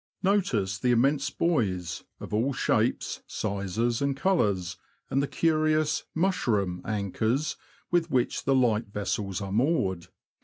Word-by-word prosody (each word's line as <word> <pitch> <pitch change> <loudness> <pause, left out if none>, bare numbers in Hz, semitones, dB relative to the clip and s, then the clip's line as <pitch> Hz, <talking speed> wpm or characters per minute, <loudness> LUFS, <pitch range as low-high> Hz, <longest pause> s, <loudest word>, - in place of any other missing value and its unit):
Notice 120 - +1
the 125 - +1
immense 135 +4 +3
buoys, 95 - -1 0.2
of - - -8
all 120 +6 +1
shapes, - - 0
sizes, 105 +4 -1
and 140 -1 0
colours, 100 - +1 0.3
and 135 - +2
the 140 - 0
curious 155 -1 +1
'' - - -51
mushroom 100 - 0
" - - -21
anchors, 110 +7 -1 0.4
with 170 -1 +2
which 125 -5 0
the 135 - +3
light 115 -3 +2
vessels 100 -1 -3
are 100 -1 -4
moored. 100 - +1
120 Hz, 140 wpm, -27 LUFS, 100-150 Hz, 0.4 s, immense